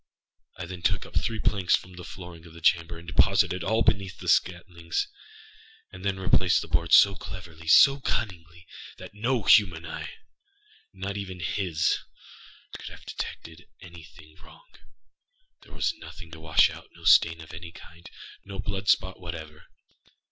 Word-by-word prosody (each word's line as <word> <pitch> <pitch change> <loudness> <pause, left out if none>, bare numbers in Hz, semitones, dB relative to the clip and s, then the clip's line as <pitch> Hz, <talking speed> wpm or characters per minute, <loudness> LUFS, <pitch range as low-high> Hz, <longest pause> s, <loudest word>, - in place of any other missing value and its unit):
I 95 - -5
then 90 0 -8
took - - 0
up - - -14
three 110 -1 -1
planks 95 -4 +2
from 90 - -8
the 90 0 -10
flooring 85 -2 -10
of 80 - -15
the - - -10
chamber, 85 0 +2
and 85 - -12
deposited 90 +1 +2
all 110 +3 +1
between 100 -2 +1
the - - -8
scantlings. 85 - 0 0.9
I - - -9
then 100 -1 -2
replaced 95 -1 +3
the - - -9
boards 85 0 +3
so 100 - +7
cleverly, 85 -4 -10
so 135 +11 +7
cunningly, 90 -8 -4 0.3
that - - -11
no 115 +2 -1
human 90 -7 +5
eyeânot 395 - -10
even 95 -2 -6
hisâcould 85 -2 0 0.9
have - - -11
detected 80 +1 -7
any 85 -2 -12
thing 75 0 -17
wrong. - - -18 0.9
There - - -19
was - - 0
nothing 85 -3 -11
to 80 - -10
wash 80 -1 +4
outâno - - -14
stain 85 0 +6
of 80 0 -11
any 85 0 -8
kindâno 90 +3 -11
blood 95 -1 -4
spot 95 0 +2
whatever. 80 -4 -8
90 Hz, 150 wpm, -27 LUFS, 85-100 Hz, 0.9 s, so